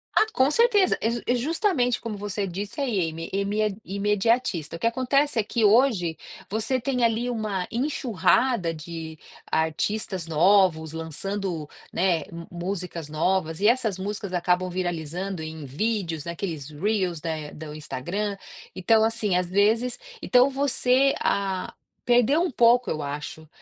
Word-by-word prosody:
Ah, - - +5
com 265 -4 +3
certeza. 420 -1 +4
E 225 - +1
ju 235 0 -2
e 245 - +2
justamente 285 - +1
como 220 -3 -5
você 205 0 -3
disse 200 - -5
aí, 240 -8 0
é - - +2
ime 195 +6 -2
é 215 - +2 0.2
imediatista. 205 - 0
O - - -8
que - - -2
acontece 260 +2 +1
é - - +2
que 225 +2 -1
hoje 205 - +3 0.3
você 225 +5 -1
tem 250 -1 0
ali 230 +2 0
uma 215 -6 -2
enxurrada 240 - +1
de 160 0 -7 0.3
artistas 175 +3 -1
novos, 165 -1 +3
lançando, 165 +1 -4 0.3
né, 175 -3 +2
mu 170 0 -8 0.3
músicas 180 -5 -5
novas 160 +1 0
e 210 - +4
essas 230 -5 +2
músicas 200 0 -4
acabam 180 +1 +1
viralizando 175 0 -3
em 155 -1 -7
vídeos, 170 - -2
naqueles 170 -4 -5
reels 180 +1 -1
eh, 155 -2 -4
do 155 -1 -8
Instagram. 175 +8 -4 0.4
Então 220 +4 +3
assim, 220 -4 0
às 180 -1 0
vezes, 220 +6 +2 0.2
então 250 +2 +4
você, 270 -1 +2
ah, 195 -2 -1 0.3
perdeu 245 +6 +4
um 355 - +1
pouco, 240 -2 +4
eu 155 - -2
acho, 150 +2 -6
200 Hz, 145 wpm, -25 LUFS, 165-235 Hz, 0.4 s, Ah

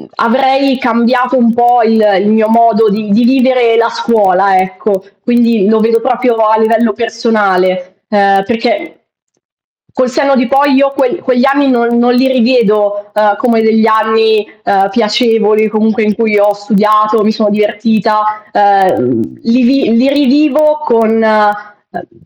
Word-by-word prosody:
avrei 265 +2 0
cambiato 250 +1 0
un 230 -2 +2
po' 240 0 +2
il 220 0 +1 0.2
il 200 - -1
mio 220 0 +1
modo 225 -1 +2
di 210 +1 -4
di 230 +4 +2
vivere 250 -2 +1
la 230 0 +2
scuola, 195 -5 0
ecco. 190 +1 -3 0.2
Quindi 235 -4 +1
lo 220 0 +2
vedo 230 +1 0
proprio 245 -1 -1
a 220 0 +1
livello 225 0 +1
personale, 200 -5 -2
uhm, 200 -2 +1
perché 245 +9 -4 0.9
col 255 -2 -1
senno 275 0 0
di 250 -1 0
poi 275 +1 +1
io 275 +1 +2
que 270 -3 -1
quegli 255 0 0
anni 275 0 +1
non 235 -1 0
non 245 +1 +1
li 255 +2 +1
rivedo, 210 -5 0
uhm, 210 -1 0
come 235 -3 0
degli 220 0 +1
anni, 220 -1 +1 0.2
uhm, 195 0 0
piacevoli 215 0 0
comunque 220 0 -1
in 210 0 0
cui 215 -1 -1
ho 205 0 +2
studiato, 215 +1 0
mi 215 - +1
sono 215 -1 -1
divertita, 215 +1 -1 0.3
uhm, 190 - +1 0.2
li 240 +2 +1
vi 255 -2 +1
li 260 +4 +2
rivivo 295 +2 +1
con 230 -1 +1
uhm 210 -2 -3
225 Hz, 150 wpm, -10 LUFS, 210-245 Hz, 0.9 s, un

